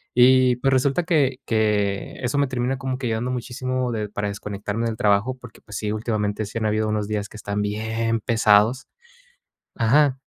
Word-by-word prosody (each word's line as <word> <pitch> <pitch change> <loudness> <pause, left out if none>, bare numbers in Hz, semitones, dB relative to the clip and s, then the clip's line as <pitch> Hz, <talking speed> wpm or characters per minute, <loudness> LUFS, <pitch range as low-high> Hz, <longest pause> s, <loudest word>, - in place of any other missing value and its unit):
y 125 0 +5
pues, 135 +2 +1
resulta 135 +5 +2
que 145 -7 +2
que 105 -3 0
eso 125 +3 -1
me 140 - +2
termina 130 +1 -1
como 130 -1 -3
que 125 - -2
ayudando 115 +3 -1
muchísimo 125 0 -2
de 105 -1 -2
para 105 0 -3
desconectarme 100 +2 -4
del 110 - -3
trabajo. 105 +5 +2
Porque, 125 -2 -13
pues 105 - -8
sí, 105 -1 -2
últimamente 110 -1 -2
sí 105 - -6
han 110 - -2
habido 110 0 0
unos 105 -1 -1
días 105 -1 -2
que 105 - -11
están 105 -1 -3
bien 110 +2 -1
pesados 110 +4 +3 0.9
ajá. 135 +4 +3
115 Hz, 180 wpm, -23 LUFS, 105-130 Hz, 0.9 s, y